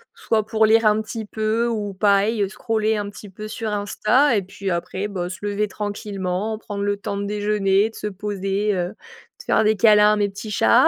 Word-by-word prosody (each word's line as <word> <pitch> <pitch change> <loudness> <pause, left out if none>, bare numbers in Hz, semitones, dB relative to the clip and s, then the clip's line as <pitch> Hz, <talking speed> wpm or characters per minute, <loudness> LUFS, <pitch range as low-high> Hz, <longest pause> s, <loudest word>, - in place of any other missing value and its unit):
soit 220 -2 0
pour 220 0 +2
lire 225 +1 +4
un 215 0 +4
petit 220 0 -6
peu 220 +2 0
ou 210 -4 -2
pareil 200 +2 +2
scroller 220 0 0
un 205 -1 -3
petit 205 0 -11
peu 210 +3 -8
sur 220 0 -4
Insta 215 +6 +2
et 205 - +2
puis 195 +1 -6
après, 180 +3 -2
bah, 180 -3 -4
se 185 - -7
lever 205 +1 0
tranquillement, 205 0 -3
prendre 205 -2 -5
le 205 0 0
temps 200 - -4
de 200 - -3
déjeuner, 205 0 +1
de - - -18
se 210 - -4
poser, 200 0 -2
heu, 175 -1 -1
de 460 - -17
faire 220 - +3
des 215 0 +3
câlins 210 -1 +6
à - - +2
mes 205 -1 +2
petits 205 +2 -8
chats, 110 - +5
210 Hz, 210 wpm, -22 LUFS, 200-215 Hz, -, câlins